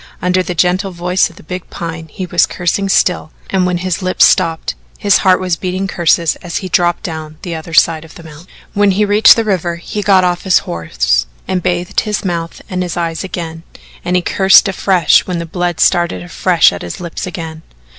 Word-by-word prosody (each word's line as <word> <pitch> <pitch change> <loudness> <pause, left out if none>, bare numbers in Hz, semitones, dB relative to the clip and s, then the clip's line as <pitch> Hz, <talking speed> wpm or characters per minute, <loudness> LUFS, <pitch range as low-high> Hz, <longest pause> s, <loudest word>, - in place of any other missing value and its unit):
Under 180 +1 +1
the 180 -1 -4
gentle 180 +3 +1
voice 180 +1 0
of 170 - -17
the - - -15
big 180 +3 -7
Pine 165 -1 -6
he 185 +4 -6
was 175 -1 +2
cursing 190 +3 -1
still, 180 -4 +1 0.2
and 185 -2 +1
when 180 -1 0
his 185 +1 -3
lips 185 0 +3
stopped, 165 -3 +1 0.2
his 200 -2 +3
heart 185 -1 +3
was 180 -2 -1
beating 185 +2 -3
curses 170 -2 +1
as 175 -2 -5
he 185 - -5
dropped 175 -1 +1
down 155 -2 -6
the 175 - -4
other 160 0 -6
side 160 -1 +3
of 160 - -15
the 170 - -12
mountain. 160 +2 -13 0.3
When 205 0 +3
he 200 +2 +2
reached 205 +2 +6
the 230 - 0
river, 180 -5 -1
he 175 +5 -5
got 195 -2 +4
off 175 -1 0
his 190 -2 +3
horse 60 -7 -1 0.2
and 185 -1 -1
bathed 175 0 -1
his 210 -1 -3
mouth 170 -2 -4
and 185 -1 -3
his 175 -1 -4
eyes 165 0 -2
again, 165 -3 -6 0.4
and 180 - -1
he 180 - +1
cursed 190 -1 +5
afresh 185 -3 +2
when 180 -2 -2
the 170 - -4
blood 175 0 -3
started 175 0 +2
afresh 175 - +2
at 85 - -7
his 85 - -7
lips 175 0 -6
again. 160 -3 -7
175 Hz, 210 wpm, -15 LUFS, 165-185 Hz, 0.4 s, reached